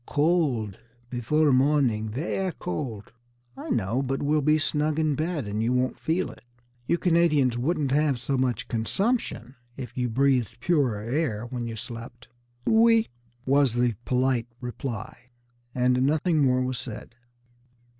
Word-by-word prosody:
"Co 145 - 0
old 135 - +1 0.3
before 145 +5 +2
morning, 130 -5 +2
ver' 170 - -2
cold!" 105 +3 -5 0.4
"I - - -8
know, 115 +3 0
but 135 +1 -2
we'll 150 +1 +2
be 150 +2 +3
snug 150 0 0
in 155 -2 +2
bed, 155 -4 -2
and 110 +4 0
won't 130 +1 -1
feel 170 +4 -1
it. - - -15 0.5
You 170 - +2
Canadians 165 -8 +3
wouldn't 140 +2 0
have 145 -1 +2
so 125 +3 -2
much 130 -2 0
consumption 125 - -1 0.2
if 125 -3 -7
you 125 -1 -1
breathed 125 -2 +1
purer 130 -7 +1
air 120 -3 -1
when 120 -1 -4
you 115 - -5
slept." 120 +1 -9 0.4
"Oui!" 225 0 +5 0.4
was 135 -3 +3
the 120 -1 +2
polite 125 -2 +1
reply; 120 -1 -6 0.5
and 125 0 +2
nothing 155 +4 +2
more 130 -3 +3
was 130 0 -2
said. 115 -1 -8
130 Hz, 145 wpm, -26 LUFS, 120-150 Hz, 0.5 s, Oui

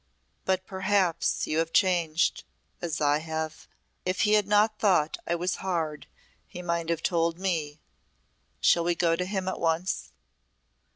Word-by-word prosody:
"But 185 0 0
perhaps 190 -3 +1
you 155 - 0
have 165 0 0
changed 170 -4 +2 0.4
as 165 -3 -3
I 145 0 +3
have. 160 0 -5 0.4
If 185 +1 -1
he 210 - +3
had 210 -2 +3
not 210 +1 +3
thought 180 -7 +2
I 170 - +1
was 180 +2 -1
hard 165 -5 -3 0.4
he 180 - -8
might 170 -1 -1
have 170 -1 -1
told 170 -1 +1
me 160 -6 -2 0.8
Shall 170 - +4
we 175 0 +1
go 165 -1 +2
to 180 +2 -2
him 190 -1 -3
at 190 - -2
once?" 165 +3 -1
170 Hz, 155 wpm, -27 LUFS, 160-190 Hz, 0.8 s, Shall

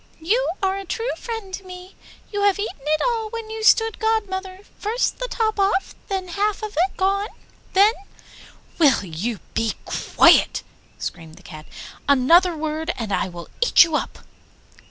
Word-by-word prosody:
You 435 +10 +1
are 385 0 +1
a - - -6
true 455 +6 -2
friend 450 -5 -6
to 390 - -5
me! 365 0 -11 0.4
You 410 -1 -2
have 405 -1 +3
eaten 405 -7 -5
it 305 +2 0
all 455 -3 -1
when 455 -1 -6
you 445 0 -5
stood 450 0 +4
godmother; 385 -4 -2 0.2
first 450 +4 -1
the - - -2
top 435 -4 -1
off, 390 -1 +1
then 380 -2 -3
half 410 +3 -1
of 425 - -3
it 360 +4 0
gone, 395 +2 +1 0.5
then 405 +3 +6 0.5
' - - -23
'Will 275 -10 +4
you 190 +7 -3 0.2
be 225 -1 0
quiet!' - - +4 0.3
screamed 160 -2 -7
the 190 - -17
Cat. 155 -3 -11 0.4
'Another 330 +6 +5
word 315 +1 -2
and 220 -4 -3
I 185 - 0
will 175 -1 -9
eat 485 - +7
you 330 -3 -2
up. - - -3
380 Hz, 170 wpm, -22 LUFS, 310-430 Hz, 0.5 s, eat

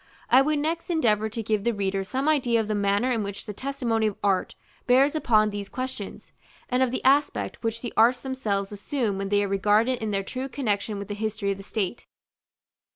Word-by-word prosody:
I 255 - +8
would 300 +2 +1
next 320 +4 -2
endeavor 220 -10 +2
to 225 +1 -5
give 215 -1 0
the 235 0 0
reader 195 -1 -1
some 260 +9 -2
idea 255 -7 +3
of 220 - -1
the 215 - -1
manner 205 +4 +1
in 230 -3 0
which 200 -1 -5
the 210 - -6
testimony 240 -3 -1
of 210 - -4
Art 195 -2 +1 0.3
bears 265 +3 +5
upon 215 -8 +3
these 205 -1 -5
questions, 255 -6 -6 0.4
and 250 +1 +1
of 260 - +3
the 255 - -3
aspect 280 +2 +2
which 230 0 -2
the 240 - -4
arts 245 +3 +4
themselves 215 -7 -2
assume 205 0 -2
when 195 0 -3
they 205 0 +3
are - - -1
regarded 210 +6 +2
in 220 - -2
their 195 -1 -1
true 260 +6 -5
connexion 215 -6 -1
with 200 -1 -6
the 205 - -4
history 210 -1 -2
of 195 - -3
the - - -9
state. 205 +2 -3
220 Hz, 215 wpm, -26 LUFS, 205-255 Hz, 0.4 s, I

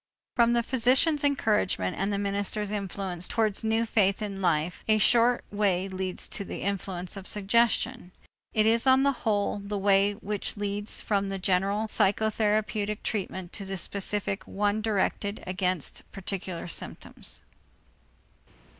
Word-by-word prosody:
From 235 -1 +4
the 235 0 +2
physician's 260 +5 +3
encouragement 210 - +1
and 195 - -1
the 200 - 0
minister's 200 +1 -2
influence 195 -3 -3
towards 220 -2 0
new 225 +1 +2
faith 200 -3 +2
in 200 -2 -4
life, 170 -1 0
a 215 -1 +5
short 240 +3 +4
way 195 -3 +1
leads 185 -1 -3
to - - -2
the - - -6
influence 190 -2 -3
of 195 -1 -7
suggestion. 210 -2 +1 0.4
It 215 -1 +2
is 230 +3 +3
on 260 +1 +6
the 280 - +4
whole 210 -5 0
the 200 +1 -4
way 200 +1 +4
which 205 0 -2
leads 205 +1 -3
from 200 -2 0
the 195 - -2
general 195 +3 +1
psychotherapeutic 210 0 +1
treatment 190 -3 -3
to 200 - -3
the 195 0 -4
specific 200 +1 -1
one 205 +1 0
directed 205 -1 -1
against 185 -3 -2
particular 190 -2 -5
symptoms. 60 - -5
205 Hz, 140 wpm, -28 LUFS, 195-220 Hz, 0.4 s, on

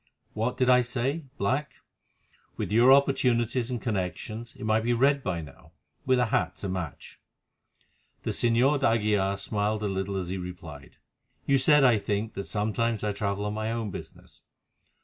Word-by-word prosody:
What 115 +4 -2
did 130 -1 +2
I 125 0 +6
say—black? 130 +1 -2 0.8
With - - -3
your 120 +4 +6
opportunities 125 -3 +3
and 125 -2 -2
connections 110 +2 -4
it - - -10
might 110 0 +2
be 120 +1 +1
red 140 +4 +3
by 90 -7 -2
now, 70 -4 -14 0.3
with 130 -1 +4
a 125 - +3
hat 90 0 0
to 100 - -5
match." 90 -6 -6 1.0
The - - -1
Señor 125 +5 +2
d'Aguilar 105 -6 +1
smiled 105 +1 -1
a - - 0
little 95 0 -2
as 90 -2 -3
he 95 +1 -3
replied. 85 -6 -9 0.5
"You 140 -1 +3
said, 150 +2 +5
I 120 -5 +5
think, 105 +2 -2
that 100 - -6
sometimes 110 +1 -1
I 105 - 0
travel 100 0 -2
on 105 - -2
my 110 +1 -2
own 115 -3 -3
business. - - -11
110 Hz, 165 wpm, -27 LUFS, 100-125 Hz, 1.0 s, I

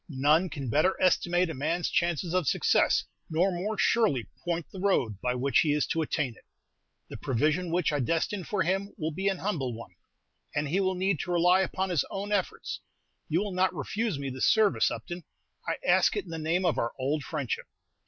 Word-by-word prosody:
None 150 +6 +3
can 140 -4 -5
better 155 +8 +2
estimate 175 -1 +2
a - - -5
man's 160 +5 -1
chances 170 -1 0
of 185 -5 +1
success, - - +3 0.3
nor 175 +5 +2
more 195 +5 -3
surely 210 - +2 0.2
point 170 -2 -2
the 190 - -7
road 125 - +1
by 125 0 0
which 130 0 +2
he 150 -2 +3
is 150 -1 +1
to 165 - -1
attain 150 -4 -1
it. - - -20 0.7
The - - -6
provision 155 +7 0
which 175 -2 +1
I 145 - +1
destine 165 - 0
for 185 +2 0
him 195 +4 -1
will 160 -3 -2
be 190 +6 -2
an 195 -1 +1
humble 145 - -2
one, 115 -5 -10 0.6
and 145 0 0
he 175 +7 +1
will 190 -1 +1
need 185 -2 0
to 180 - -3
rely 180 +2 +4
upon 190 +1 -1
his 160 -7 +2
own 200 +1 -4
efforts. 200 -3 -2 0.5
You 165 +4 +2
will 205 -2 -4
not 185 0 +1
refuse 200 - -2
me 140 -1 -4
this 130 0 0
service, 220 -2 +4
Upton. 175 0 -6 0.4
I - - 0
ask - - +4
it 410 - -2
in - - -10
the 165 - -4
name 165 +4 0
of 170 - +1
our 115 - -1
old 140 +3 -1
friendship." 140 -3 -3
170 Hz, 205 wpm, -28 LUFS, 145-190 Hz, 0.7 s, rely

